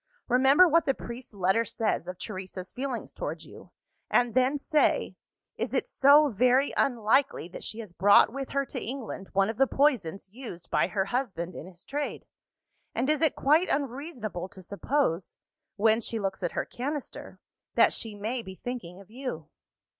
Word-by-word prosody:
Remember 270 +8 +6
what 335 0 +3
the 270 - +2
priest's 235 -2 -9
letter 190 +4 +2
says 225 0 -2
of 180 0 -6
Teresa's 185 -2 -7
feeling 255 -2 -4
towards - - -6
you, - - -13 0.4
and 240 -2 +2
then 260 +3 +3
say 300 +1 +1 0.4
Is - - -2
it - - +1
so 285 +2 +6
very 255 +5 +3
unlikely 240 - +2
that - - -9
she 220 - -5
has 205 -6 -11
brought 200 +5 +5
with 270 0 -4
her 275 0 0
to - - -6
England 235 -6 -6
one 195 0 +3
of 220 0 -4
the 270 - +4
poisons 235 - +1
used 220 -8 -9
by - - +3
her 190 +1 -1
husband 195 -7 -3
in 165 - -8
his 180 -2 -13
trade? 290 +1 -4 0.7
and 265 +5 +1
is 305 - 0
it 320 -4 +3
quite 310 +6 +3
unreasonable 250 - -3
to 185 - -12
suppose 200 - -1 0.4
(when 220 +2 +3
she 225 0 -3
looks 195 -2 -3
at 175 - -2
her - - -1
canister) 285 +3 -6 0.4
that - - +5
she 220 -2 -5
may 225 +5 -3
be 190 -3 -9
thinking 190 -7 -6
of 195 +1 -16
you? 240 - -6
235 Hz, 175 wpm, -28 LUFS, 195-275 Hz, 0.7 s, Remember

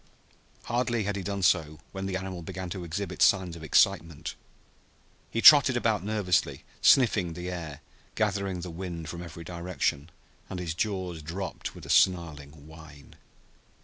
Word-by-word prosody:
Hardly 120 -2 -1
had 100 0 -2
he 100 - -3
done 100 0 -4
so 80 -3 +2
when 95 0 -5
the 95 -1 -2
animal 95 -2 -6
began 90 +2 -6
to 90 -1 -5
exhibit 90 +2 -5
signs 95 -4 +3
of 80 - -10
excitement. 80 0 +1 1.0
He 115 - -2
trotted 140 -3 +8
about 110 -5 0
nervously, 100 -4 0 0.2
sniffing 105 -10 +4
the 90 +2 -5
air, 80 -6 -7 0.3
gathering 100 -4 -1
the 90 0 -6
wind 85 -2 -6
from 85 +2 -6
every 85 -1 -9
direction, 85 -3 -3 0.4
and 95 - -5
his 85 -2 -3
jaws 90 -3 -3
dropped 90 +5 -6
with - - -11
a - - -3
snarling 75 -5 +1
whine. 80 -3 -14
90 Hz, 150 wpm, -28 LUFS, 80-100 Hz, 1.0 s, trotted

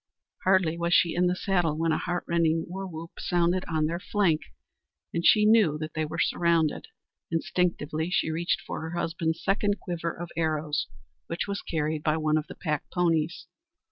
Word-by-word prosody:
Hardly 185 -3 +3
was 170 +1 +2
she 170 - +4
in 180 +1 +2
the 180 - +1
saddle 175 -5 0
when 165 0 +1
a 155 - +1
heartrending 170 -2 0
war 190 +2 -5
whoop 165 -1 -8
sounded 175 +1 +1
on 155 -2 +1
their 170 +2 -2
flank, 180 -5 +1 0.7
and 170 - -1
she 210 +3 +6
knew 210 -9 +5
that 155 0 -5
they 155 0 -1
were 155 +2 -6
surrounded! 170 -2 +1 0.4
Instinctively 165 -1 -1
she 160 - +1
reached 170 +2 0
for - - -5
her 160 +2 -5
husband's 165 -1 -2
second 205 +1 +1
quiver 170 -3 -3
of 175 +1 -8
arrows, 155 -2 0 0.4
which 170 - -3
was 200 -1 -3
carried 155 -1 -2
by 155 0 +1
one 155 -1 +1
of 150 - -7
the - - -9
pack 150 -3 -3
ponies. 170 -2 0
170 Hz, 175 wpm, -27 LUFS, 155-180 Hz, 0.7 s, she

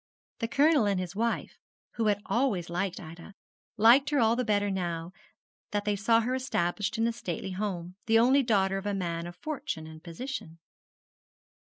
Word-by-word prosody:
The 230 - -1
Colonel 285 -1 +4
and 200 -2 +1
his 180 0 -5
wife, 230 +2 -2 0.3
who 225 -2 -1
had 205 0 +1
always 210 -10 0
liked 180 +1 -2
Ida, 170 +4 -11 0.4
liked 240 +6 +6
her 295 - +1
all 230 -2 +4
the 250 - 0
better 205 -3 +1
now 170 -2 -3 0.6
that 205 0 -2
they 210 -1 +1
saw 225 +3 +3
her 245 +3 -1
established 205 -8 -1
in 225 - +2
a 235 - +1
stately 190 -4 -5
home 185 -3 -4
the 225 0 +5
only 255 +5 +5
daughter 195 -6 +2
of 200 - -6
a 205 - 0
man 170 -3 -3
of 175 - -9
fortune 280 - -4
and 160 +1 -12
position. 170 -1 -6
205 Hz, 180 wpm, -29 LUFS, 175-235 Hz, 0.6 s, liked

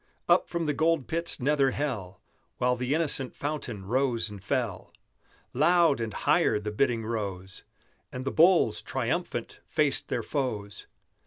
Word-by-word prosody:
Up 175 +1 +4
from 170 -1 -2
the 150 - +1
Gold 160 -2 +1
Pit's 165 0 -1
nether 140 +1 +3
hell, 115 -10 -3 0.4
While 125 0 +2
the 125 +3 -1
innocent 145 -5 -1
fountain 135 -9 -4
rose 120 -1 0
and 100 -2 -10
fell, 115 -8 -2 0.6
Loud 160 +1 +4
and 115 -1 -2
higher 105 - +2
the 105 0 -4
bidding 115 0 0
rose, 95 -5 -4 0.5
And 130 +1 -6
the 135 - -1
bulls, 165 - +4
triumphant, - - -3
faced - - +1
their - - -2
foes. 105 -8 -3
125 Hz, 145 wpm, -28 LUFS, 105-150 Hz, 0.6 s, Up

